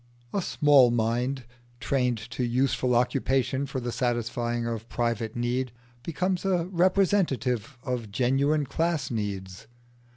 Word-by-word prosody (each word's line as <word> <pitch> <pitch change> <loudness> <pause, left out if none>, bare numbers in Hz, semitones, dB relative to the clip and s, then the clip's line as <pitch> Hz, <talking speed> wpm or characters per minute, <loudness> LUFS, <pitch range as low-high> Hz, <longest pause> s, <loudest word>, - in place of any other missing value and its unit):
A 200 - +1
small 145 -7 +5
mind 120 +3 0 0.4
trained 125 -3 +1
to 125 - -2
useful 125 0 +1
occupation 130 +2 +1
for 130 - -3
the 120 -1 -3
satisfying 120 -1 -1
of 115 -1 -4
private 115 -2 -1
need 120 +1 -1 0.3
becomes 180 +5 -1
a 180 -3 +1
representative 170 - +1
of 125 -5 -3
genuine 135 +6 +2
class 160 -2 -1
needs. 100 -2 -4
125 Hz, 120 wpm, -27 LUFS, 120-140 Hz, 0.4 s, small